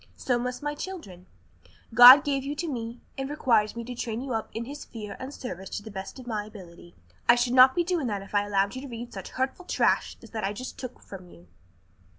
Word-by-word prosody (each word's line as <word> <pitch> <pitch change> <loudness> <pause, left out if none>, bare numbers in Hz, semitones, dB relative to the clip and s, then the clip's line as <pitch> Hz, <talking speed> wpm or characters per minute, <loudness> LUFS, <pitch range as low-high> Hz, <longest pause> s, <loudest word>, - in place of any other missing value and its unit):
So 245 -2 0
must 250 +2 -4
my 295 0 -1
children. 245 - -8 0.7
God 250 +5 +11
gave 275 -2 0
you 285 +2 -4
to 335 +3 -3
me 235 -4 -5 0.2
and 270 0 -3
requires 230 -8 +2
me 235 - -5
to 250 +2 -7
train 235 -1 -4
you 265 -2 -4
up 220 -1 -3
in 230 +1 -5
His 290 +3 -8
fear 215 -3 -8
and 260 +2 -6
service 190 -9 -7
to 205 - -7
the 220 - -9
best 190 +3 -7
of 255 - -10
my 215 -3 -2
ability. 175 -5 -13 0.3
I 235 - +9
should 240 0 0
not 260 0 +7
be 345 - +2
doing 340 -6 -1
that 200 -3 -3
if 195 - -15
I 205 0 +2
allowed 200 -1 +1
you 260 - -6
to 280 - -8
read 240 -1 -8
such - - -7
hurtful 265 +8 -3
trash - - +1
as - - -13
that 220 -2 -4
I 195 +1 -1
just 255 +5 -8
took 255 -1 -8
from 185 -2 -11
you." 85 - -17
240 Hz, 240 wpm, -27 LUFS, 205-265 Hz, 0.7 s, God